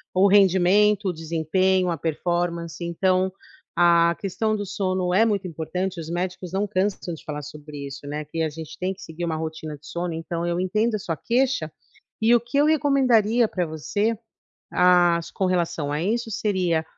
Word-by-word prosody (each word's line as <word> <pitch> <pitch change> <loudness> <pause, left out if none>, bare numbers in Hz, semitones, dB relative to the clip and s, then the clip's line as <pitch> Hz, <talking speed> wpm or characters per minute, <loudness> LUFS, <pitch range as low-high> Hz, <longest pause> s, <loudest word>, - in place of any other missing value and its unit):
o 190 +2 +5
rendimento, 200 +1 +4
o - - -2
desempenho, 175 +3 +1
a 165 - -2
performance. 170 +1 -2
Então, 185 +2 +1 0.4
a 170 -1 +4
questão 205 +3 -1
do 205 -1 -3
sono 185 -2 -1
é 215 +5 +5
muito 205 -4 0
importante, 180 +3 -3
os 160 -1 -7
médicos 180 +1 -3
não 195 +2 0
cansam 190 -2 -1
de 160 - -10
falar 150 -1 -5
sobre 150 -1 -8
isso, 135 +1 -9
né, 150 +1 -4
que 165 +2 -4
a 160 - 0
gente 160 0 -9
tem 185 +1 -2
que 195 - -16
seguir 165 -2 -7
uma 165 -1 -1
rotina 155 -1 -5
de 145 +1 -16
sono, 170 +2 -3
então 165 +1 -4
eu 175 0 -1
entendo 215 +5 +1
a - - -2
sua 165 -4 -3
queixa, 240 - 0 0.5
e 230 +2 +5
o - - +5
que 240 +4 -3
eu 290 - +5
recomendaria 255 -7 +3
para 180 -4 -2
você, 160 +8 -1 0.6
às 175 -2 +4
com 190 - -1
relação 170 -5 -1
a 150 +2 -1
isso, 225 +4 -1
seria 180 -6 0
180 Hz, 185 wpm, -24 LUFS, 165-200 Hz, 0.6 s, o